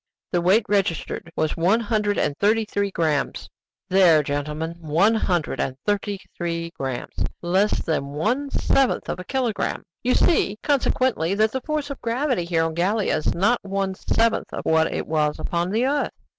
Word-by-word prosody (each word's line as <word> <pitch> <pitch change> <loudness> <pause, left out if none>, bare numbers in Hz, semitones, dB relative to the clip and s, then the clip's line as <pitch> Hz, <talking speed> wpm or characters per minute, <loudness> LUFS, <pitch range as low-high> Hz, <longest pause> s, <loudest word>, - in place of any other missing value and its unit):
The 175 - +1
weight 195 +6 +4
registered 180 -4 -1
was 155 -1 0
one 185 +7 +3
hundred 210 -2 0
and 145 - 0
thirty 220 +2 +3
three 200 -1 -1
grammes. 155 -6 -1 0.4
"There, 180 -5 +5
gentlemen, 150 +4 -3
one 170 +7 +2
hundred 180 -7 0
and 130 -1 -2
thirty 205 -1 0 0.2
three 170 -1 -3
grammes! 130 -5 -4 0.2
Less 190 +4 +1
than 155 -4 -1
one 220 - -1
seventh 270 -1 +1
of - - -3
a - - -5
kilogramme! 245 0 -2 0.2
You 250 +1 +2
see, 210 - +2
consequently, 255 - +1
that 215 +1 +2
the 260 - -3
force 300 0 -3
of 280 - -7
gravity 240 - 0
here 165 -1 +1
on 165 0 -1
Gallia 195 +6 +1
is 155 - -1
not 220 +8 +2
one 195 -1 -2
seventh 230 +4 0
of - - -6
what 160 0 +3
it - - -3
is 150 -2 +1
upon 175 +1 -2
the 225 +5 +1
earth!" 285 +2 +1
195 Hz, 170 wpm, -23 LUFS, 165-225 Hz, 0.4 s, There